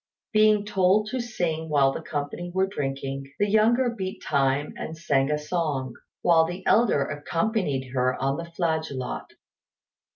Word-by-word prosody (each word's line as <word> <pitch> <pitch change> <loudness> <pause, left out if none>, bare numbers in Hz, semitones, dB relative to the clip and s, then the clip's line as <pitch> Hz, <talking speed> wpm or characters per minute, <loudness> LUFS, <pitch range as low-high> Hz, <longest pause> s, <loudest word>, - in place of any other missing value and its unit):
Being 215 -1 +4
told 205 +1 +2
to 260 - -2
sing 170 -9 -2
while 140 -2 +4
the 150 - -5
company 155 +3 -4
were 190 +1 +2
drinking, 135 -5 -4
the 205 - +2
younger 225 +5 +3
beat 190 -3 -5
time 140 0 +1
and 160 - -6
sang 140 -3 +1
a 150 - +1
song, 150 -5 -2 0.3
while 165 -2 +5
the 175 +3 -5
elder 215 -11 +4
accompanied 150 - -1
her 130 0 0
on 135 +1 0
the 170 - -5
flageolet. 160 -6 -3
160 Hz, 150 wpm, -26 LUFS, 140-195 Hz, 0.3 s, while